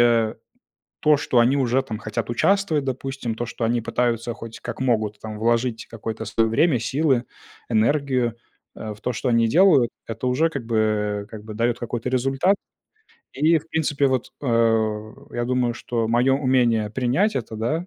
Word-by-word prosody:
э, 115 -2 +3 0.7
то, 150 -1 +5
что 130 -3 +1
они 125 +4 +4
уже 130 0 +2
там 110 -5 -5
хотят 110 0 -4
участвовать, 160 +3 +1
допустим, 130 -3 -3
то, 120 - -3
что 115 0 -3
они 115 +1 +1
пытаются, 120 0 -1
хоть 115 -1 -9
как - - -6
могут, 110 -5 0
там 110 0 -7
вложить 115 0 0
какое-то 110 0 -6
свое 110 +2 +1
время, 130 +3 +3
силы, 130 +1 +1 0.4
энергию, 125 +1 +1 0.4
э, 110 -1 -5
в 105 - -17
то, 125 - -2
что 125 +3 -2
они 115 -1 +3
делают, 150 - +5 0.2
это 115 +3 -3
уже 145 +6 +2
как 135 -7 -5
бы, 115 -1 -1 0.5
э, - - -14
как 105 -1 -10
бы 110 - -7
дает 120 +2 0
какой-то 120 +1 -3
результат. 135 +9 +2 0.8
И, 160 +4 +3
в 160 +2 -17
принципе, 145 -3 +1
вот, 130 -2 -1
э, 110 -3 +1 0.2
я 120 - -2
думаю, 125 -1 0
что 115 -1 -2
мое 120 +3 +3
умение 125 -5 +2
принять 130 - +1
это, 115 -3 -4
да, 155 +11 -1
120 Hz, 175 wpm, -23 LUFS, 115-135 Hz, 0.8 s, то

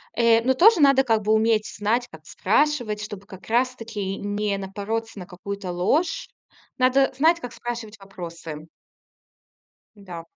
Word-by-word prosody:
Э, 230 -1 +4
но 260 +2 +3
тоже 390 - +6
надо 275 -2 +5
как 225 -4 +1
бы 215 +2 +1
уметь: 220 -1 +2
знать, 225 +4 0
как 155 -1 -14
спрашивать, 235 -1 0
чтобы 205 -2 -8
как 190 -3 -13
раз-таки 230 -5 -1
не 205 0 -2
напороться 205 +3 -4
на 180 - -7
какую-то 195 0 -6
ложь. 315 - 0 0.5
Надо 265 +1 +3
знать, 325 +4 +4
как 245 -7 -8
спрашивать 230 -2 -6
вопросы. 170 -5 -9 1.3
Да. 175 -5 -9
215 Hz, 140 wpm, -24 LUFS, 195-250 Hz, 1.3 s, тоже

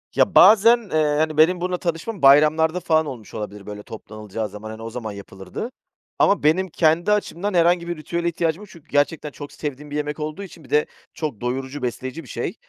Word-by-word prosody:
Ya, - - +2
bazen, 225 +3 +8
eee, 150 -2 +2
hani, 155 -1 0
benim 175 +3 +4
bununla 180 0 -1
tanışmam 175 +5 -4
bayramlarda 155 +4 +5
falan 160 -2 +2
olmuş 125 -7 -9
olabilir, 105 -2 -7
böyle, 105 0 -8
toplanılacağı 110 0 -7
zaman, 105 +2 -9
hani, 110 +1 -8
o 115 - -6
zaman 115 -2 -6
yapılırdı. 100 - -8 0.5
Ama 200 - +3
benim 180 +5 +3
kendi 165 +4 +2
açımdan 205 -1 -1
herhangi 170 0 +3
bir 175 - -3
ritüele 170 +2 -3
ihtiyacım 170 +1 -1
yok. 210 - -12
Çünkü 165 -5 -16
gerçekten 145 +1 0
çok 145 0 -9
sevdiğim 145 0 -6
bir - - -4
yemek 150 +1 -3
olduğu 155 +6 -4
için 170 -4 -12
bir - - -17
de 150 0 +3 0.3
çok 150 -9 -5
doyurucu 130 +3 -3
besleyici 130 +5 -4
bir - - -15
şey. - - -4
155 Hz, 200 wpm, -22 LUFS, 130-170 Hz, 0.5 s, bazen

